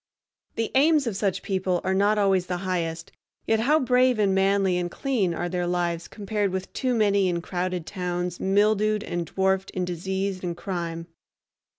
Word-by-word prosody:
The 225 -1 -2
aims 295 +1 +4
of 230 -4 -2
such 195 -2 -1
people 185 -2 0
are 190 - 0
not 205 +2 +3
always 195 -3 +2
the 180 - -2
highest, 165 -3 -2 0.3
yet 225 0 +2
how 295 +7 +3
brave 250 -2 +3
and 200 -2 +2
manly 195 -1 +2
and 175 0 -2
clean 225 -4 0
are 175 - -2
their 175 0 -2
lives 175 -1 -1
compared 205 -1 -2
with 190 0 -5
too 255 -2 0
many 200 -3 +3
in 170 -1 -1
crowded 180 -1 -3
towns 180 -1 -3
mildewed 210 +2 +2
and 175 -4 -3
dwarfed 190 +1 0
in 185 -1 -2
disease 190 +2 -3
and 175 -2 -4
crime! 170 -2 -4
190 Hz, 175 wpm, -25 LUFS, 175-210 Hz, 0.3 s, aims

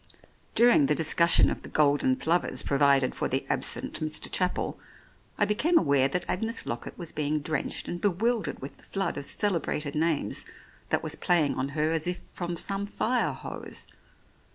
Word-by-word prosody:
During 235 - +5
the 150 - +2
discussion 165 +2 +5
of - - -5
the - - -10
golden 140 -3 +2
plovers 160 +7 0
pro 140 - -1
vided 140 -3 +4
for - - -2
the - - -2
absent - - -1
Mr. 155 0 -3
Chapel, 180 -1 -1 0.6
I 205 - +3
became 295 +12 +2
aware 140 - +3
that 175 +6 -3
Agnes 225 +5 -1
Lockett 120 0 -6
was 170 -3 -5
being 150 0 -1
drenched 150 0 -2
and 175 - -5
bewildered 210 - 0
with 135 - -8
the - - -17
flood 195 -1 -2
of 145 - -4
celebrated 160 -6 +1
names 160 -1 -1 0.5
that - - 0
was - - -2
playing 165 -5 +2
on 130 +1 -3
her 155 +1 +1
as 165 0 -1
if 180 0 -1
from 175 -1 -4
some 195 +3 -3
fire 240 +4 0
hose. - - -6
165 Hz, 175 wpm, -27 LUFS, 145-195 Hz, 0.6 s, During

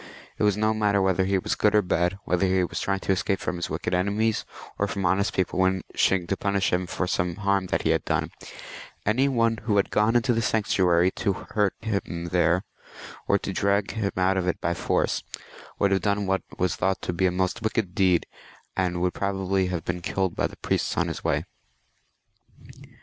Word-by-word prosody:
It - - +1
was 105 -1 +3
no 110 +1 +2
matter 105 -2 +2
whether 95 -1 +2
he 95 0 +2
was 95 - -1
good 105 0 +2
or 105 - +5
bad, 90 +1 0
whether 90 +2 +1
he 95 0 +2
was 90 - -3
trying 100 -1 -1
to - - -1
escape 95 +1 0
from 90 - -3
wicked - - -3
enemies, 100 +4 +1 0.3
or 100 - +1
from 100 -1 -3
honest 95 +3 +2
people 95 0 -1
wishing 95 0 +1
to 95 - -1
punish 100 -1 0
him 90 0 0
for 95 - -2
some 90 -1 -1
harm 100 -2 0
that - - -1
he - - +2
had - - +1
done; - - -1 0.7
any 130 +6 +3
one 115 -3 +2
who 105 -2 0
had 100 - +1
gone 105 +3 +2
into 120 +1 +3
the 115 - +1
sanctuary 95 -5 +2
to 100 0 -1 0.2
hurt 105 -3 +1
him 100 -6 -3
there, 90 +1 +2 0.6
or 100 - +4
to 95 - -5
drag 100 +1 +1
him 105 -3 -2
out 95 +1 +2
of 90 -1 0
it 90 - 0
by 85 - 0
force, - - 0 0.6
would 100 - +2
have 95 -1 +2
done 100 +2 0
what 95 0 +1 0.2
was 90 -2 0
thought 95 +1 0
to - - -2
be 95 +2 +2
a - - +1
most 95 +4 -1
wicked 110 -4 -1
deed, 90 -3 +3 0.5
and 90 -2 0
would 90 0 +1
probably 95 -1 0
have 90 -3 -3
been 90 0 -3
killed 95 0 -1
by - - +1
the - - -14
priests - - -1
on - - +1
his - - -6
way. - - 0
95 Hz, 205 wpm, -25 LUFS, 90-100 Hz, 0.7 s, or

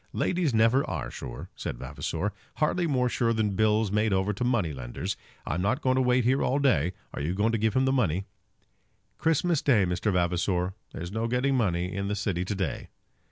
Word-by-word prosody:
"Ladies 175 -5 +1
never 115 +4 +4
are - - -3
sure," 65 -3 -8
said - - -5
Vavasor; 105 +10 -3 0.2
"hardly 170 +3 +1
more 130 -4 +2
sure 115 -1 +1
than 105 -3 0
bills 110 -1 +2
made 105 +1 +2
over 95 +2 +1
to 100 - -3
money 115 -11 +1
lenders. - - -4 0.3
I'm 80 +5 -1
not 130 +10 0
going 130 -1 +3
to 130 - +3
wait 125 0 +3
here 130 +4 +2
all 135 - +1
day. 120 - +2 0.2
Are - - -4
you 80 +5 -1
going 105 +3 +2
to 115 - 0
give 110 +2 +1
him 130 0 +3
the 135 - +2
money?" 100 - +1 0.9
"Christmas 165 +1 +2
day, 115 -9 +4
Mr. 90 +4 0
Vavasor! 90 +1 0 0.2
There's 85 +2 -6
no 110 +2 -1
getting 125 +3 +1
money 90 -6 0
in 100 +1 -2
the 105 - -1
city 95 -3 -1
to 100 - -2
day." 95 -2 -3
105 Hz, 205 wpm, -27 LUFS, 90-125 Hz, 0.9 s, never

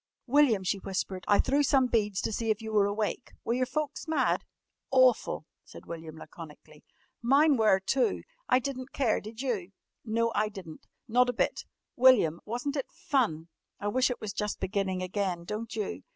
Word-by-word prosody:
"William," 255 -7 +4
she 195 +2 0
whispered, 190 -1 -4
"I 205 - +5
threw 280 +2 +2
some 270 -2 +4
beads 210 -5 0
to - - -2
see 225 +1 -2
if 215 -1 +1
you 220 -1 -6
were 205 -1 +4
awake. 210 +4 -3
Were 235 - 0
your 255 +1 0
folks 300 +3 -3
mad?" 315 - +1 0.5
"Awful," 255 -10 +3 0.2
said - - -13
William 160 -1 -8
laconically. 155 -2 -12 0.4
"Mine 280 +5 +4
were 215 -5 +4
too. 250 +7 0 0.3
I 250 - +6
di'n't 260 0 -5
care, 250 -6 +1
did 220 +4 -8
you?" 200 -8 -2 0.3
"No, 230 +1 0
I 215 0 +1
di'n't. 180 -6 -11 0.2
Not 250 +2 +3
a - - 0
bit!" - - -1 0.3
"William, 240 -11 +5
wasn't 245 +6 -3
it 275 - -3
fun? 230 - -1 0.3
I 205 - -2
wish 255 +5 +2
it 250 - -3
was 210 -2 -5
just 210 0 -3
beginning 190 -1 -1
again, 185 -2 -2
don't 220 +4 -5
you?" 215 -3 -3
220 Hz, 180 wpm, -29 LUFS, 195-255 Hz, 0.5 s, I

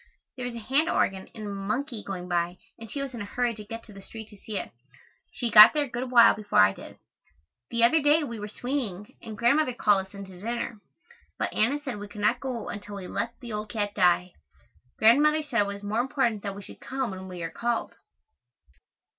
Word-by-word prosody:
There 250 -1 -4
was 240 - -6
a 230 -2 -8
hand 290 +7 +2
organ 190 - 0
and 210 -2 -5
monkey 215 +4 -3
going 180 -2 -6
by 175 0 -1 0.2
and 225 -1 -10
she 280 +4 -3
was 270 -2 -6
in 235 - -6
a - - -4
hurry 240 +3 -1
to 215 -1 -9
get 225 +2 -8
to 215 - -14
the 195 - -11
street 220 +2 -10
to 210 - -14
see 205 +1 -6
it. - - -5 0.6
She 235 -2 -1
got 215 +1 +11
there 300 -1 +1
a - - -5
good 250 +1 -3
while 235 -2 +7
before 210 -1 -3
I 95 0 +7
did. - - -12 0.7
The 235 0 +1
other 305 +7 +5
day 295 +2 +4
we 235 -6 -5
were 210 - -5
swinging 215 -4 -4
and 220 -2 -8
Grandmother 255 +3 +2
called 200 -5 +2
us 190 - -24
in 200 0 -7
to 185 -2 -13
dinner, 235 0 -3 0.6
but - - -2
Anna 245 +7 +2
said 265 -7 -6
we 205 - -7
could 205 0 -9
not 215 +4 +2
go 255 -3 -4
until 205 0 -7
we 195 -2 -7
"let 235 +5 -4
the 235 -3 -7
old 210 0 -4
cat 205 -2 -2
die." 180 -1 +3 0.7
Grandmother 295 +8 +5
said 245 -7 +1
it 205 - 0
was 200 0 -6
more 210 +3 -1
important 245 -5 0
that 200 -1 -5
we 200 - -9
should - - -13
come 260 -3 -3
when 190 0 -8
we 180 -2 -7
are 165 - -4
called. 235 -1 -2
220 Hz, 230 wpm, -27 LUFS, 200-245 Hz, 0.7 s, got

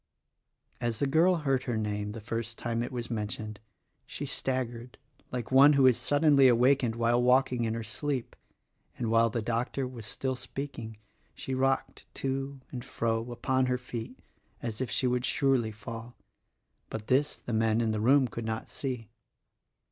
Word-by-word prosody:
As 120 -2 -1
the 140 - +1
girl 165 +6 +4
heard 135 -5 0
her 120 -2 -1
name 105 -1 -2
the 115 - -6
first 115 +1 -4
time 115 -1 -2
it 120 - -3
was 120 -2 -5
men 105 -2 -1
tioned 105 0 -6 0.5
she - - -5
staggered 125 -2 -3 0.3
like 125 -1 -4
one 140 +3 +8
who 140 -2 +5
is 130 -2 +7
suddenly 145 0 +4
awakened 125 0 +4
while 120 +1 +2
walking 125 -1 +3
in 110 0 -1
her 115 - -3
sleep, 130 +3 -3 0.6
and 115 -3 -1
while 115 0 +5
the 115 0 -2
doctor 120 +3 -1
was 120 -4 -8
still 130 +4 -2
speaking 125 -3 -6 0.4
she 135 - -5
rocked 135 +1 0
to 135 0 -3
and 125 -2 -5
fro 115 +1 -2
upon 130 +1 +1
her 125 0 +1
feet 120 -2 -7 0.4
as 115 0 -5
if 130 - -1
she - - 0
would 125 0 +1
surely 130 -4 +2
fall— 115 +2 -8 0.7
but 110 -1 -5
this 135 +5 +2
the 120 - -7
men 110 0 +2
within 115 -1 +1
the 110 -1 -1
room 130 +3 +5
could 115 0 -6
not 110 0 -3
see. 125 -5 -4
120 Hz, 170 wpm, -29 LUFS, 115-130 Hz, 0.7 s, one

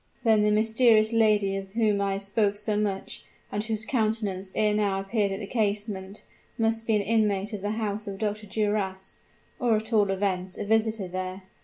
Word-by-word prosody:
"Then 220 -3 +4
the 210 - +3
mysterious 220 +1 +4
lady 210 -3 +3
of 195 0 -8
whom 215 -3 +2
I 200 -1 0
have 195 +1 -3
spoken 205 0 +1
so 210 +1 -2
much, 205 -2 -2 0.3
and 210 - -2
whose 220 0 -2
countenance 215 -6 -1
ere 215 -1 +2
now 205 -2 +1
appeared 200 +1 0
at 195 - -3
the 210 - -5
casement, 205 -2 -2 0.3
must 225 -1 0
be 220 - +3
an 205 - +1
inmate 210 -1 +1
of 205 - -4
the 205 - -2
house 210 -1 -3
of 195 -1 -5
Dr. 210 0 -3
Duras; 195 -2 -2 0.4
or 240 -3 +3
at 220 +2 -3
all 205 -2 +4
events, 190 -1 -1
a - - -4
visitor 220 -2 +1
there! 185 +1 -5
210 Hz, 190 wpm, -27 LUFS, 195-220 Hz, 0.4 s, Then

